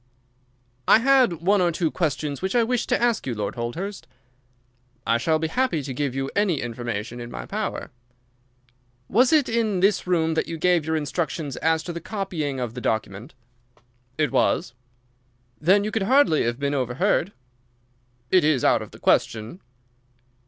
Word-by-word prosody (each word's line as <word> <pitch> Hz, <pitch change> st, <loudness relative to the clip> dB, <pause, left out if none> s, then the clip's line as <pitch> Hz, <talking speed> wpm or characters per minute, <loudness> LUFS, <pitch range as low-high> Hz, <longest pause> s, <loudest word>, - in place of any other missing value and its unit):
"I -, -, +8 dB
had 245 Hz, -, +3 dB
one 200 Hz, +2 st, +3 dB
or 175 Hz, -1 st, +2 dB
two 165 Hz, -1 st, -1 dB
questions 150 Hz, -4 st, -2 dB
which 190 Hz, +5 st, -2 dB
I 240 Hz, -, +4 dB
wished 245 Hz, +1 st, -1 dB
to -, -, +2 dB
ask 235 Hz, -, +1 dB
you, 120 Hz, -, -2 dB
Lord 105 Hz, -2 st, -3 dB
Holdhurst." 170 Hz, -, -5 dB, 1.0 s
"I 115 Hz, 0 st, +2 dB
shall 160 Hz, +5 st, +2 dB
be 160 Hz, +1 st, -2 dB
happy 175 Hz, -, 0 dB
to 135 Hz, -1 st, -5 dB
give 135 Hz, 0 st, -2 dB
you 135 Hz, 0 st, -2 dB
any 195 Hz, -7 st, +1 dB
information 120 Hz, -1 st, -5 dB
in 120 Hz, 0 st, -7 dB
my -, -, -7 dB
power." 215 Hz, +1 st, -4 dB, 1.2 s
"Was 245 Hz, +5 st, +3 dB
it 305 Hz, -4 st, +4 dB
in 225 Hz, -4 st, 0 dB
this 195 Hz, 0 st, +2 dB
room 165 Hz, -3 st, +1 dB
that 160 Hz, -, -1 dB
you 165 Hz, -, -5 dB
gave 175 Hz, -1 st, +2 dB
your 160 Hz, -, 0 dB
instructions 155 Hz, -1 st, -3 dB
as 160 Hz, 0 st, +1 dB
to 175 Hz, -, -5 dB
the 170 Hz, -, -6 dB
copying 165 Hz, -9 st, -3 dB
of 120 Hz, -3 st, -3 dB
the 125 Hz, -, -7 dB
document?" 110 Hz, 0 st, -3 dB, 0.8 s
"It 150 Hz, -1 st, +1 dB
was." 125 Hz, -2 st, +1 dB, 0.9 s
"Then 190 Hz, +7 st, +4 dB
you 215 Hz, -, -2 dB
could 225 Hz, -, -1 dB
hardly 265 Hz, -, +4 dB
have 120 Hz, 0 st, -1 dB
been 140 Hz, 0 st, -1 dB
overheard?" 140 Hz, -, 0 dB, 1.0 s
"It 185 Hz, -, +5 dB
is 150 Hz, -5 st, +2 dB
out -, -, +4 dB
of -, -, -8 dB
the -, -, -15 dB
question." 115 Hz, -, 0 dB
160 Hz, 170 wpm, -24 LUFS, 130-200 Hz, 1.2 s, I